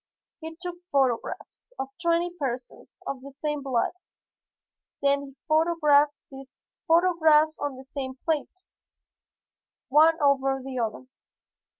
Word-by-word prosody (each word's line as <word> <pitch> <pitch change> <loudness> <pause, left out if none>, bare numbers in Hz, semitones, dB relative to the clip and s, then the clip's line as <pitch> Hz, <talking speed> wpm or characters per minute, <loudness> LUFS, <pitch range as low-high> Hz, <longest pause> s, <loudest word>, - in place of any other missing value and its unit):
He 320 -1 -8
took 355 -1 -6
photographs 270 - -1
of 270 - -4
twenty 340 0 +1
persons 265 -7 -6
of 275 -2 -4
the 275 +1 -10
same 295 +1 -3
blood, 260 -4 0 1.1
then 280 0 +2
he 275 -1 -11
photographed 310 -2 +3 0.2
these 270 0 -12 0.3
photographs 320 -3 +4
on 285 -2 -3
the 265 - -11
same 260 -1 -5
plate, 325 +4 -2 1.2
one 315 +4 +5
over 270 -2 +2
the 260 -2 -4
other. 230 +2 -3
285 Hz, 115 wpm, -26 LUFS, 270-320 Hz, 1.2 s, one